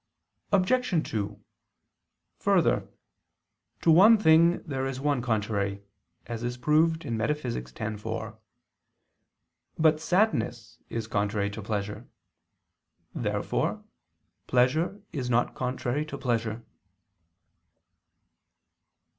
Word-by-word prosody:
Obj. 200 -2 +2
2: 105 -1 -3 1.0
Further, - - +2 0.9
to 165 - +4
one 205 +8 +8
thing 170 -2 +4
there 135 -4 -3
is 135 -1 -4
one 140 -2 0
contrary, 105 -4 -1 0.4
as 115 -1 -5
is 120 +1 -3
proved 160 +4 +2
in 115 - -2
Metaph. 150 +6 -1
x, 105 - -5
4. - - -5 1.4
But 155 -1 +4
sadness 160 - 0
is 115 -1 -3
contrary 105 -1 -1
to 110 - -7
pleasure. 105 +2 -4 1.1
Therefore - - -1 0.6
pleasure 155 +11 +1
is 130 -5 -3
not 120 0 +2
contrary 125 +2 -2
to - - -6
pleasure. 115 -2 -2
125 Hz, 95 wpm, -27 LUFS, 110-160 Hz, 1.4 s, one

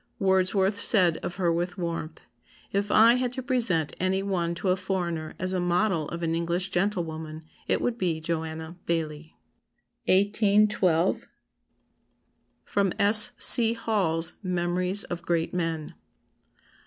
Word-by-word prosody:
Wordsworth 190 0 +1
said 185 -6 +3
of 175 - -6
her 175 -3 0
with 175 +2 -3
warmth, 170 -2 -5 0.5
'If 200 +1 -2
I 225 +3 +5
had 250 0 -2
to 260 0 -6
present 230 - -1
any 190 +1 -1
one 175 -4 -2
to 185 - -3
a 180 - +3
foreigner 175 -4 -4
as 185 0 -4
a 185 - -1
model 175 -2 0
of 170 0 -6
an 165 0 -1
English 170 +3 -2
gentlewoman, 160 -5 -3 0.2
it - - 0
would 240 -1 -2
be 170 -5 -1
Joanna 160 +1 -5
Baillie.'" 160 -2 -4 0.7
1812. 200 -3 +2 1.4
[Sidenote: 200 -3 -1
S. 210 +1 +7
C. 230 -1 +6
Hall's 180 -8 0
Memories 180 +1 0
of 175 -1 -6
Great 170 -1 -2
Men. 165 -3 -3
180 Hz, 130 wpm, -25 LUFS, 165-200 Hz, 1.4 s, S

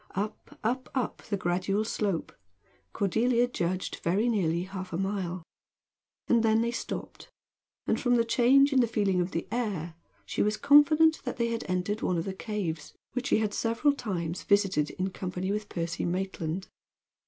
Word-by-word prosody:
Up 205 +3 -4
up 250 +4 -1
up, 255 -4 -2
the 200 - 0
gradual 190 +4 0
slope, 200 -6 -2 0.6
Cordelia 235 +5 +2
judged, 185 -5 -2
very 195 +8 +1
nearly 175 -6 +1
half 185 0 -7
a 165 - -2
mile 185 -2 -2 0.8
and 235 -1 +4
then 220 0 +3
they 235 - 0
stopped; 235 - -6 0.6
and - - 0
from 245 -1 +3
the 230 -1 +3
change 270 +4 +5
in 265 - +4
the 240 - +4
feeling 200 -5 +1
of 175 - -1
the 165 - -3
air 200 -9 -2 0.3
she - - -2
was 210 +1 +1
confident 305 +2 +6
they 240 -2 -1
had 230 -1 -2
entered 185 +4 -1
one 180 - 0
of 165 - -2
the 195 - -3
caves, 190 -7 -4 0.2
which 250 0 -2
she - - +3
had 215 -1 0
several 230 +7 +2
times 180 - -3
visited 195 -7 +2
in 190 +1 -3
company 185 +1 -3
with 210 0 -3
Percy 165 -1 -3
Maitland. 185 -1 -2
205 Hz, 165 wpm, -29 LUFS, 180-235 Hz, 0.8 s, confident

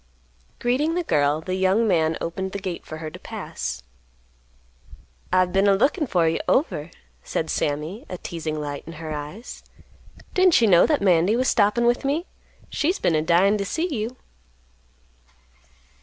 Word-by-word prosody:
Greeting 280 +7 0
the 355 - 0
girl 150 - +1
the 185 +3 -4
young 190 +4 +2
man 160 -4 +2
opened 190 +3 -4
the - - -2
gate 190 -3 -5
for 155 - -6
her 160 -1 -6
to - - -10
pass. - - -6 1.5
"I've 185 -1 +2
been 195 +1 +3
a 200 - +5
lookin' 290 - +1
for 175 -7 +2
you 160 - 0
over," 175 - +1 0.3
said - - -2
Sammy, 150 +9 -2
a 180 - -5
teasing 160 -3 -5
light 145 -1 -5
in 165 - -7
her 160 0 -7
eyes. 150 +11 -7 0.7
"Didn't 370 -2 +5
you 235 - +4
know 175 -4 +6
that 295 -9 +1
Mandy 180 +2 +4
was 255 +2 +1
stoppin' 215 +2 +3
with 240 +1 +2
me? 295 +6 0 0.5
She's 345 +6 0
been 170 - +1
a 155 - +2
dyin' 185 +6 +3
to - - 0
see 320 - -2
you." 225 +3 -4
190 Hz, 165 wpm, -23 LUFS, 160-240 Hz, 1.5 s, know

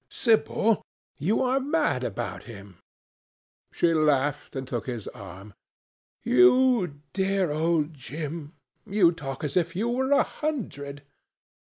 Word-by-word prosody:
"Sibyl, 225 -2 +2 0.4
you 200 - +1
are 260 +1 +2
mad 290 - 0
about 120 -5 -4
him." 100 -5 -12 0.9
She 170 -1 +2
laughed 145 -2 +1
and 130 -1 -4
took 120 -1 -4
his 120 -5 -5
arm. 95 +2 -11 0.7
"You 170 - +4
dear 195 -3 +1
old 160 0 +1
Jim, 150 +2 -6 0.3
you 190 -4 +4
talk 140 -5 -6
as 145 -2 -3
if 170 -1 +1
you 220 +6 0
were 265 +3 0
a 285 - +5
hundred. 145 - -5
155 Hz, 125 wpm, -26 LUFS, 135-210 Hz, 0.9 s, a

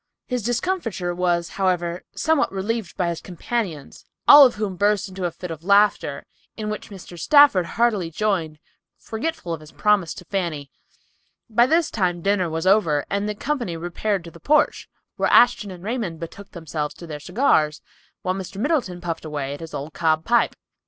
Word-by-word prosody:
His 250 -2 -2
discomfiture 230 - -2
was, 175 -1 0
however, 180 -2 -1
somewhat 315 -3 +1
relieved 205 +2 -3
by 180 -3 +1
his 170 - -4
companions, 180 - -4 0.2
all 290 -2 +11
of 245 - -6
whom 205 -3 -3
burst 205 +2 +1
into 190 -1 -5
a 175 - -1
fit 175 +1 -8
of 160 0 -8
laughter, 200 +2 +2 0.3
in 215 -1 -3
which 210 - -6
Mr. 180 -3 -11
Stafford 285 - +5
heartily 215 -7 +2
joined, 165 -4 -1 0.4
forgetful 225 - -4
of 165 - -5
his 155 0 -14
promise 210 -6 +1
to 180 - -11
Fanny. 165 -7 -3 0.8
By 235 +3 +4
this 325 +3 +2
time 175 -5 -1
dinner 195 -3 +1
was 160 +1 -3
over 185 -7 +3
and 200 +1 -1
the 210 - -3
company 240 - -3
repaired 175 +3 -2
to 170 - -10
the 170 - -14
porch, 300 - +1 0.3
where - - +1
Ashton 235 -3 +5
and 180 -2 -10
Raymond 210 -7 -3
betook 195 +4 -9
themselves 155 -3 -5
to 170 - -10
their 150 -3 -7
cigars, 155 - +1 0.4
while 185 - 0
Mr. 190 0 -7
Middleton 235 - -1
puffed 165 -2 -4
away 145 -3 -4
at 145 - -8
his 165 -1 -8
old 145 +2 -6
cob 160 -1 +1
pipe. 235 0 +2
185 Hz, 180 wpm, -23 LUFS, 170-215 Hz, 0.8 s, all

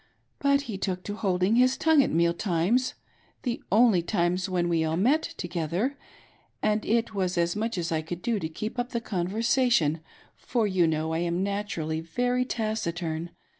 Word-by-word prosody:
But 280 0 +3
he 225 -8 -6
took 185 -2 -2
to 205 - -4
holding' 195 +1 +1
his 255 +1 +4
tongue 320 -2 +5
at - - +1
meal 170 +1 +2
times 195 +8 +1 0.2
— - - -36
the 245 -2 -2
only 215 -3 +5
times 175 0 0
when 175 -2 0
we 165 -2 +1
all 160 +1 0
met 265 - +3 0.2
together 175 - -2 0.3
— - - -36
and 215 0 +2
it 230 0 +1
was 185 -2 -1
as 170 +1 +1
much 225 0 -2
as 170 -1 -2
I 160 -1 +1
could 175 +2 -7
do 230 -3 0
to 160 - -3
keep 215 +9 -5
up 245 +2 -3
the 235 - +1
conversation, 210 - +1 0.4
for 235 -3 -1
you 185 -4 +2
know 160 0 -1
I 160 - 0
am 175 +1 0
naturally 195 -6 -2
very 245 +9 0
taciturn. 175 -8 -2
190 Hz, 185 wpm, -27 LUFS, 170-230 Hz, 0.4 s, tongue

